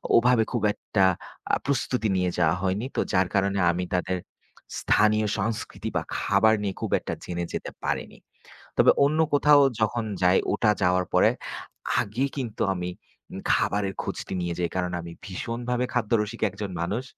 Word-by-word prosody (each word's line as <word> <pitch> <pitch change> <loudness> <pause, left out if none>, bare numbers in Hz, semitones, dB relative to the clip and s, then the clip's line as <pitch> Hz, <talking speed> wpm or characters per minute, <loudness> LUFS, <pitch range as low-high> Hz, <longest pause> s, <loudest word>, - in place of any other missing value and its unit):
ওভাবে 120 -1 +5
খুব 120 -4 -1
একটা 100 -1 0 0.5
আ - - +7
প্রস্তুতি 130 -4 0
নিয়ে 90 -1 +1
যাওয়া 85 -1 +3
হয়নি। 95 +5 0
তো - - 0
যার 95 -1 +3
কারণে 100 0 +2
আমি 90 +1 -2
তাদের 90 0 0 0.6
স্থানীয় 110 0 +3
সংস্কৃতি 105 +2 -3
বা - - +1 0.2
খাবার 110 0 +3
নিয়ে 100 -2 -2
খুব - - -3
একটা - - -5
জেনে 85 0 -3
যেতে - - -4
পারিনি। - - -3 0.6
তবে - - +7
অন্য 155 +3 +1
কোথাও 145 0 +6 0.2
যখন 115 +2 +1 0.2
যাই, 90 +1 +5 0.2
ওটা 110 - +2
যাওয়ার 90 0 +3
পরে - - +5 0.7
আগে 115 +7 0
কিন্তু 120 -6 -2
আমি 90 0 -3 0.4
উম - - -6
খাবারের 100 -1 0
খোঁজটি - - -5
নিয়ে 85 -1 -2
যাই, 85 -1 0
কারণ 90 -1 -1
আমি 85 0 -8
ভীষণভাবে 120 +6 -2
খাদ্যরসিক 115 -1 0
একজন 100 +1 -6
মানুষ। 100 +9 -1
105 Hz, 155 wpm, -26 LUFS, 90-115 Hz, 0.7 s, আ